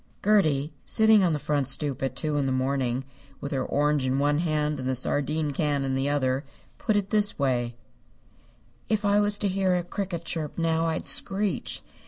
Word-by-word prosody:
Gertie, 155 -9 +2
sitting 220 -2 +5
on 175 - +3
the - - 0
front 145 -2 -1
stoop 135 -1 0
at 135 -1 -2
two 155 +1 0
in 140 -2 0
the - - 0
morning, 130 -1 -1 0.3
with 140 - -6
her 135 - -1
orange 145 -1 +1
in 130 +1 0
one 145 +1 +2
hand 150 -3 -1
and 130 0 -3
the 130 - 0
sardine 145 +3 0
can 145 -1 0
in 135 - -1
the 135 +1 0
other, 135 -1 0 0.4
put 215 - 0
it 200 -1 -1
this 210 -1 +2
way: 120 -4 0 1.1
"If 215 -1 0
I 205 0 +4
was 205 0 +2
to 205 - -1
hear 190 -1 +1
a 175 - -1
cricket 175 -2 -5
chirp 155 -4 -4
now, 165 0 +1
I'd 160 - -3
screech. 200 +1 0
150 Hz, 195 wpm, -26 LUFS, 135-185 Hz, 1.1 s, sitting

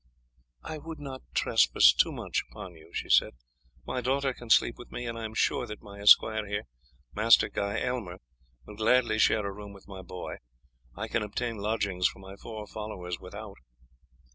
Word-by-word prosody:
"I 155 - -6
would 160 +2 -8
not 135 -2 -7
trespass - - +5
too - - +3
much - - -2
upon 95 -2 -9
you," 80 -1 -17
she - - -4
said. - - +4 0.5
"My 130 - -2
daughter 135 +2 0
can 120 -1 -12
sleep 115 - +4
with 120 - -11
me, 120 - -5
and 115 -1 -4
I 115 -1 -5
am 110 0 -7
sure - - +1
that 105 - -8
my 100 -1 -11
esquire 110 +1 +6
here, 105 +1 -2 0.5
Master 110 +2 +5
Guy 100 +1 -2
Aylmer, 115 -9 -3 0.5
will 105 - -11
gladly 115 0 +3
share 110 -1 +3
a 100 - -2
room 100 0 -9
with 100 - -15
my 95 -2 -8
boy. 90 0 -7 0.6
I 110 +3 -4
can 115 - 0
obtain 115 +2 -3
lodgings 100 -3 0
for - - -7
my 95 0 -11
four 110 0 -8
followers 95 -5 -6
without." 100 +2 -9
105 Hz, 185 wpm, -29 LUFS, 100-115 Hz, 0.6 s, esquire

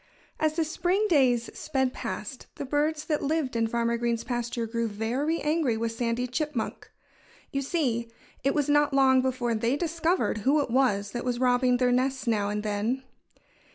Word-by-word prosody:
As 310 -1 +2
the 330 - +2
spring 355 +6 0
days 250 -7 +3
sped 265 -4 -1
past, 230 +1 -6
the - - -5
birds 300 +2 0
that 305 -1 0
lived 290 -3 -1
in 230 0 +2
Farmer 235 +1 0
Green's 235 -1 -1
pasture 240 -1 -2
grew 230 +1 -1
very 245 +10 -1
angry 300 -6 +1
with 230 0 -1
Sandy 235 +1 -1
Chipmunk. 260 -1 -3 0.6
You 275 - -1
see, 255 -6 -1 0.3
it 275 - +1
was 295 -2 +1
not 295 -1 +3
long 265 -1 +5
before 255 -2 -1
they 230 +5 0
discovered 335 - 0
who 275 +8 +3
it 280 -5 -1
was 210 -6 +2
that 240 - -4
was 245 -1 -1
robbing 250 0 +3
their 250 0 +2
nests 260 +1 0
now 210 -4 +1
and 210 0 -2
then. 215 +5 -1
255 Hz, 175 wpm, -27 LUFS, 235-295 Hz, 0.6 s, long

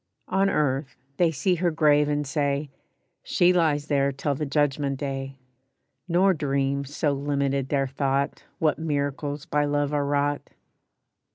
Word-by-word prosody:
On 195 +1 +2
earth 140 -4 0 0.2
they 175 -2 +4
see 160 +5 0
her 175 +1 +1
grave 150 -2 +3
and 145 0 0
say: 140 0 -1 0.5
"She 180 0 +3
lies 155 -4 +2
there 140 -2 +1
till 140 +2 -2
the 150 +2 -3
judgment 140 -1 0
day;" 135 -1 -4 0.7
Nor 185 +2 +4
dream, 140 -2 -1
so 145 +2 -1
limited 140 -1 -1
their 140 -2 +1
thought, 135 +1 -1
What 155 -1 +1
miracles 145 -1 -2
by 150 0 +1
love 145 0 0
are 145 -1 0
wrought. 145 0 0
145 Hz, 145 wpm, -25 LUFS, 140-150 Hz, 0.7 s, they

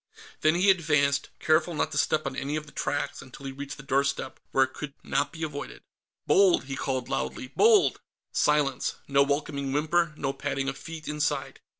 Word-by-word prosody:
Then 155 +1 +3
he 190 +3 +5
advanced, 145 -5 +2
careful 155 +1 +2
not - - 0
to - - -4
step 155 0 +1
on 135 -1 -3
any 140 +2 -2
of 155 0 -3
the 150 - -14
tracks 145 - -2
until 130 +2 -12
he 135 - -3
reached 140 +2 -7
the 135 - -10
doorstep, 140 -1 0
where 135 - +4
it 130 - -3
could 145 -2 -7
not 135 +2 0
be 165 - -7
avoided. 145 -2 -6 0.4
"Bold!" 195 -3 +5
he 135 0 -5
called 130 -2 -2
loudly. 135 -1 -3
"Bold!" 435 -2 +5 0.3
Silence. 145 -3 +1
No 140 0 +4
welcoming 140 -1 0
whimper, 155 +2 +1
no 135 -2 -1
padding 135 -1 -2
of 135 - -2
feet, 165 +1 -9
inside. 150 0 -1
145 Hz, 190 wpm, -27 LUFS, 135-155 Hz, 0.4 s, he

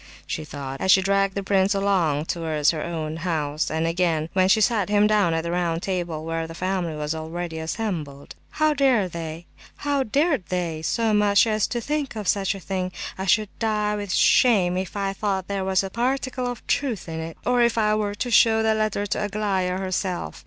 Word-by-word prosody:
she 155 - -4
thought, 135 -2 -7
as 190 - -1
she 190 - +8
dragged 195 0 +1
the 200 - -2
prince 195 +1 +2
along 180 -7 +1
towards 160 -3 +1
her 155 -2 -4
own 160 -2 -4
house, 155 -3 -1
and 160 +1 -1
again 165 -2 0
when 185 -1 +3
she 220 - +5
sat 210 -2 +2
him 205 0 +4
down 210 -5 +3
at 165 0 -1
the 170 - -3
round 170 -1 -1
table 175 -5 -3
where 165 0 -2
the 165 - -9
family 180 -3 -2
was 150 +1 -2
already 160 +1 -5
assembled. 160 -5 -4 0.2
"How 310 0 +1
dared 255 -10 +2
they 180 - -2
so 225 +4 +1
much 210 0 +4
as 215 -2 +1
think 275 +3 -3
of 210 -3 -5
such 195 0 +1
a - - -7
thing? 185 0 -3 0.2
I 190 +1 -5
should 215 +2 +3
die 210 -2 0
with 205 -2 -4
shame 190 -5 +4
if 185 +2 -4
I 195 -1 -1
thought 195 -2 -2
there 200 -1 -2
was 190 0 +1
a 195 - -5
particle 255 +2 -1
of 245 -2 -6
truth 245 -11 -1
in 160 0 -5
it, 160 0 -6
or 245 -1 +3
if 235 -1 +2
I 215 -1 +3
were 210 -1 -1
to 245 +3 -3
show 220 0 +5
the 220 0 +3
letter 215 -2 -1
to 205 - -2
Aglaya 195 -3 -1
herself! 185 -1 -3
190 Hz, 195 wpm, -24 LUFS, 165-215 Hz, 0.2 s, she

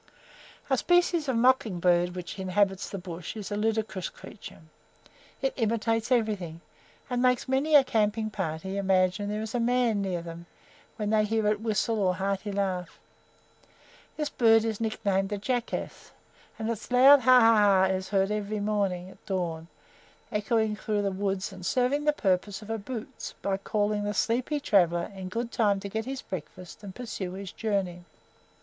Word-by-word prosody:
A 265 -3 +2
species 350 -3 +2
of 260 - +1
mocking 230 -6 +3
bird 175 0 +2
which 180 +2 -7
inhabits 190 +1 0
the 200 - -5
bush 175 +1 -7
is 210 -1 -6
a - - -1
ludicrous 215 -3 -1
creature. 200 - -12 0.8
It 270 - +1
imitates 225 0 0
everything, 205 -9 0 0.5
and 245 -2 -1
makes 250 -1 +2
many 275 +4 +2
a 285 - +8
camping 215 -2 0
party 190 0 -4
imagine 190 +1 +1
there 210 +1 -2
is 220 - -6
a 245 - 0
man 235 -3 +2
near 180 -3 -2
them, 170 0 -9 0.5
when 210 -2 -2
they 215 -1 +4
hear 220 0 0
its 210 0 +1
whistle 220 0 0
or 185 -2 +2
hearty 195 +2 -2
laugh. 190 -3 -2 1.2
This 300 -1 -1
bird 225 -3 +4
is 225 -1 -3
nicknamed 200 -3 0
the 205 - -2
"Jackass," 240 +3 -3 0.5
and 220 0 -3
its 230 -2 -4
loud 265 +3 +8
"ha! 255 0 +6
ha! 225 -1 +6
ha!" 200 -2 +5
is 190 0 0
heard 195 0 +1
every 210 0 -2
morning 200 -4 -1
at - - -19
dawn 170 -4 -3 0.6
echoing 215 0 0
through 210 -1 -2
the 200 - 0
woods 195 0 -2
and 185 -1 -10
serving 255 +9 +1
the 300 - +5
purpose 195 -4 -1
of 215 - -7
a 225 - -2
"boots" 225 +1 -7
by 195 -1 +1
calling 205 +1 -1
the 205 0 -2
sleepy 250 +8 0
traveller 175 -9 +2
in 190 -1 -6
good 235 +4 -3
time 205 -3 +2
to 200 - -5
get 220 +2 -3
his 265 0 -5
breakfast 180 0 -8
and 195 -2 -9
pursue 210 -7 -5
his 190 -1 -7
journey. 195 -5 -2
210 Hz, 170 wpm, -28 LUFS, 190-230 Hz, 1.2 s, a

